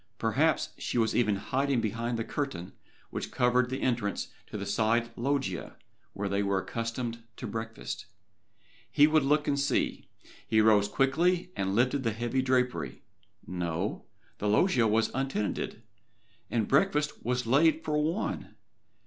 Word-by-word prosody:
Perhaps - - +2
she - - -2
was 110 -2 +2
even 105 -4 +3
hiding 135 +6 0
behind 115 +2 -2
the 115 - -1
curtain 135 - -4 0.4
which - - -4
covered 125 0 +2
the 130 +1 -3
entrance 115 -5 -1 0.2
to - - -6
the - - -4
side 115 +2 +1
loggia 130 -8 -2 0.4
where 100 0 -3
they 100 +1 0
were 100 -1 +1
accustomed 115 +4 -3 0.2
to - - -6
breakfast. 115 +1 -5 0.8
He 145 +4 +6
would 155 0 +4
look 150 +2 +2
and 140 -1 +1
see. 140 -1 0 0.4
He 110 - +3
rose 105 -2 +5
quickly 170 - +1
and 95 0 -1
lifted 125 +4 +2
the 115 -4 0
heavy 120 +4 0
drapery. 125 - 0 0.4
No 85 -2 -3 0.3
the 105 - -1
loggia 120 - +4
was 110 +1 +2
untenanted, 125 -4 -2 0.7
and 115 -3 0
breakfast 150 +2 +2
was 125 +1 0
laid 155 +6 +4
for 150 - 0
one! 160 +7 -2
120 Hz, 145 wpm, -29 LUFS, 110-135 Hz, 0.8 s, He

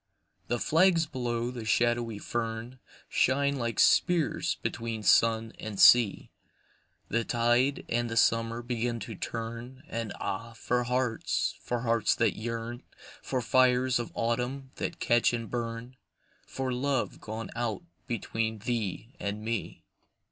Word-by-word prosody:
THE 120 - 0
flags 165 +5 +4
below 120 -4 -2
the 120 -2 -6
shadowy 120 0 +1
fern 115 +3 -4 0.3
Shine 140 +2 +2
like 115 -2 -2
spears 175 -4 +3
between 115 -2 -3
sun 115 +1 +4
and 105 -3 -6
sea, 120 -5 +6 0.8
The 115 +1 +1
tide 120 +4 +2
and 120 0 0
the 115 - -3
summer 115 +1 +2
begin 120 -1 -2
to 110 - -6
turn, 115 +5 -6
And 115 -2 -4
ah, 110 +4 -4
for 125 +2 -1
hearts, 125 -2 0
for 120 -1 -2
hearts 115 -3 +2
that 115 -3 +2
yearn, 115 +2 -4 0.4
For 130 -2 -2
fires 130 0 +3
of 120 - -4
autumn 125 +3 -2
that 165 - -4
catch 120 -1 +3
and 115 -2 -4
burn, 120 +1 -4 0.5
For 130 -1 -3
love 135 0 -1
gone 110 +1 -6
out 120 +5 -2 0.2
between 115 -2 -2
thee 115 0 -3
and 100 +1 -3
me. 115 -1 -3
120 Hz, 135 wpm, -29 LUFS, 115-125 Hz, 0.8 s, sea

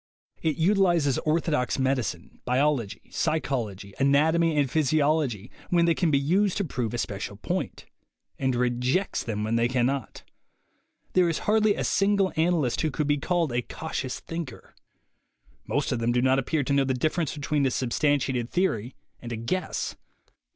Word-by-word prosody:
It 155 -3 0
utilizes 175 -6 +3
orthodox 155 -5 +1
medicine, 130 -10 -2
biology, 125 -4 0
psychology, 110 -11 -2
anatomy 155 +4 +3
and 145 -2 +3
physiology 145 -6 +1 0.2
when 170 -1 +3
they 170 - +4
can 170 0 +1
be 145 - +3
used 180 +8 +1
to 200 - +1
prove 125 - -3
a - - -2
special - - -4
point, - - -4 0.5
and 130 -2 +1
rejects 125 +9 0
them 105 -2 -3
when 110 +2 0
they 115 +1 +3
can 125 -1 +1
not. 135 -3 -3 0.9
There 180 -2 +4
is 165 - -1
hardly 215 -1 +3
a - - -2
single 195 -1 +2
analyst 160 -6 +1
who 155 - +1
could 150 +1 -2
be 145 0 +1
called 170 -1 0
a 120 - +1
cautious 135 -1 -5
thinker. 165 -7 -7 0.9
Most - - 0
of 125 - 0
them 115 +1 +1
do 120 - +2
not 130 +1 +3
appear 145 +3 0
to 140 - -1
know 140 0 +4
the 130 -1 0
difference 155 +4 -1
between 145 0 0
a - - +2
substantiated 130 -1 0
theory 125 - -1 0.3
and 120 - -7
a 115 - -3
guess. 180 +12 -2
140 Hz, 165 wpm, -26 LUFS, 125-165 Hz, 0.9 s, they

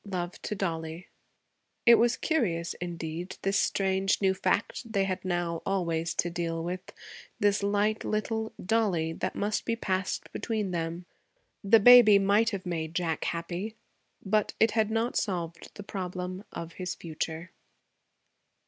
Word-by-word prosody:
Love 180 -3 -4
to 210 - -3
Dollie.' 165 -2 -4 0.8
It 235 - +9
was 235 +1 +4
curious, 180 - 0
indeed, 170 0 -5
this 195 +1 +2
strange 195 0 +1
new 190 -1 +3
fact 200 +5 -1
they 200 -3 +2
had 190 -1 -2
now, 175 -2 -1
always, 170 -4 -1
to 175 - 0
deal 165 -1 -2
with; 180 +2 -5 0.5
this 205 0 +3
light 205 +2 +1
little 220 +1 -2
'Dollie' 180 -6 +1
that - - -3
must 210 +1 -1
be 230 - -1
passed 190 -4 -2
between 215 -4 -2
them. 170 +1 -3 0.6
The 215 +3 +6
baby 235 -2 +9
might 200 +3 +3
have 195 -3 -5
made 165 -2 -3
Jack 165 -3 -1
happy, 175 +6 -3 0.5
but 210 +1 +1
it 220 0 +5
had 220 -1 +1
not 225 +2 0
solved 170 -4 -3
the 205 - -8
problem 185 0 -5
of 170 0 -7
his 180 -1 -3
future. 165 +1 -5
190 Hz, 145 wpm, -29 LUFS, 170-210 Hz, 0.8 s, It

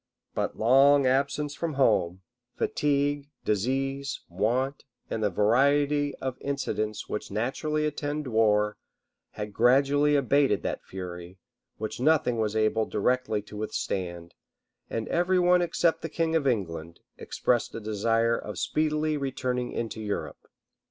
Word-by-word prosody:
But - - -2
long 135 +4 +5
absence 140 +3 +1
from 160 0 -3
home, 95 -9 +2 0.3
fatigue, 145 0 0 0.2
disease, 135 +6 -1
want, 120 +10 -1 0.3
and 110 - -2
the 105 - +2
variety 140 +8 +2
of 130 -1 -5
incidents 110 -6 -2
which 105 - -4
naturally 145 +8 -1
attend 150 0 -3
war, 105 -3 +2 0.6
had 105 -1 -6
gradually 140 +5 +4
abated 140 +1 +2
that - - -3
fury, 90 -1 -8 0.4
which 110 +2 -5
nothing 130 -4 +2
was 110 -1 -1
able 110 0 +1
directly 110 -1 0
to 105 - -11
withstand; 85 -5 -4 0.6
and 115 -1 -3
every 180 +2 +2
one 180 0 +4
except 170 -1 +1
the 165 - -4
king 165 +1 0
of 150 -4 +1
England, 85 -8 -2 0.2
expressed 120 -2 -1
a - - -3
desire 115 +2 +1
of 105 -4 -6
speedily 155 0 0
returning 125 -3 -2
into 115 -1 -4
Europe. 105 -2 -5
130 Hz, 130 wpm, -27 LUFS, 105-145 Hz, 0.6 s, long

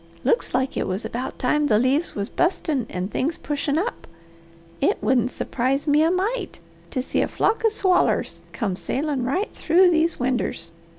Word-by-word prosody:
Looks 470 - +1
like 260 +1 0
it - - -1
was 190 +4 -3
about 245 +4 -4
time 295 +4 +1
the 210 - +4
leaves 265 +8 +1
was 200 0 -2
bustin' 315 - 0
and 185 +2 -4
things 305 +5 -1
pushin' 290 0 -2
up. 425 +9 -3 0.7
It - - +2
wouldn't 250 -2 +2
surprise 260 +3 -1
me 295 0 +4
a 320 - +4
mite 390 +3 -1 0.3
to 255 - -2
see - - 0
a - - +1
flock 445 +1 0
of 450 - +4
swallers 375 -4 +1
come 200 -7 -2
sailin' 275 +6 -2
right 365 - -1
through 355 +3 +4
these 330 0 +1
winders. 245 -9 -1
285 Hz, 175 wpm, -23 LUFS, 250-345 Hz, 0.7 s, the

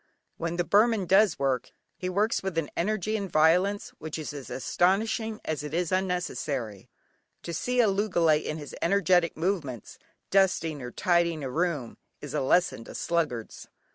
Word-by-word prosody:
When 170 0 -3
the 175 - +1
Burman 210 +1 +3
does 195 +1 +4
work, 135 -2 0 0.3
he 185 - -4
works 210 +5 +1
with 190 -3 -4
an 160 -3 -1
energy 215 +3 -1
and 200 -3 -3
violence 180 +6 +3
which 160 0 -5
is 155 -2 -5
as 140 -3 -8
astonishing 215 - 0
as 155 -2 -2
it 150 +1 -5
is 175 -1 0
unnecessary. 155 - -2 0.5
To 170 - -5
see 250 +9 -1
a 225 - +4
loogalay 185 -6 +2
in 155 - -3
his 145 -2 -8
energetic 175 -3 +2
movements, 155 - -3 0.3
dusting 180 -6 +2
or 125 - -5
tidying 170 +1 +1
a 130 - -4
room 155 -6 -2 0.2
is - - -8
a - - 0
lesson 155 -3 +2
to - - -10
sluggards. 155 -10 -2
170 Hz, 165 wpm, -27 LUFS, 150-195 Hz, 0.5 s, does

